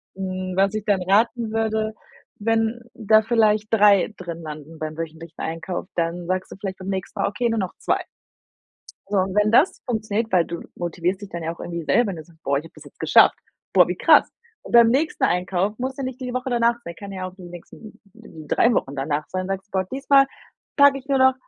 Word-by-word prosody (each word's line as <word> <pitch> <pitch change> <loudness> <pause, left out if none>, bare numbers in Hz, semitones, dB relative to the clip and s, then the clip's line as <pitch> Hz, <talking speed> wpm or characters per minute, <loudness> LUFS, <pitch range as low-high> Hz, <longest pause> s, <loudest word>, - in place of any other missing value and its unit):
Hm, 185 -1 -4
was 195 +2 +2
ich 215 -1 -3
dann 200 -3 +2
raten 225 +5 +2
würde, 220 -1 -1 0.4
wenn 225 +2 0
da 220 -1 +3
vielleicht 215 -1 +2
3 205 -1 +5
drin 170 -2 -7
landen 155 +1 -9
beim 155 0 -4
wöchentlichen 165 0 -8
Einkauf, 165 +3 -4
dann 170 +1 -2
sagst 185 +1 -2
du - - -7
vielleicht 195 -1 -5
beim 190 +1 -7
nächsten 190 -1 -4
Mal: - - +2
„Okay, 235 +4 -1
nur 225 - -1
noch 190 -3 -3
2.“ - - 0 1.1
So 205 - 0
und 190 0 0
wenn 210 0 +3
das 275 +10 +4
funktioniert 220 -1 -2
weil 175 -3 +3
du 170 0 -6
motivierst 175 +2 -2
dich 205 - -8
dann 170 -2 -6
ja 165 +1 -2
auch - - -20
irgendwie 170 -1 -5
selber, 240 +7 +2
wenn 190 - -4
du 160 - -8
sagst: 160 0 -23
„Boah, 140 0 +1
ich 145 - -4
habe - - -14
das - - -14
jetzt - - -17
geschafft. - - +5 0.4
Boah, - - +6
wie - - -2
krass.“ - - +5 0.3
Und - - -10
beim 235 -1 +8
nächsten 280 +7 0
Einkauf 185 +3 0
muss 260 +1 -3
ja 275 - -4
nicht 260 0 -6
die 250 -1 -4
Woche 255 +1 -2
danach 235 0 +3
sein, 170 - -7
kann 200 +2 -9
ja 185 -1 -5
auch 185 - -11
die 190 - -13
nächsten 175 +5 -12
3 160 +10 0
Wochen 140 -8 -1
danach 145 +2 -2
sein, 185 0 -3
sagst 195 +1 -4
du: - - -49
„Boah 190 -1 0
diesmal 275 0 +4 0.5
packe 280 -1 +6
ich 270 - -19
nur 275 -1 +2
noch 260 0 +5
195 Hz, 225 wpm, -23 LUFS, 175-225 Hz, 1.1 s, beim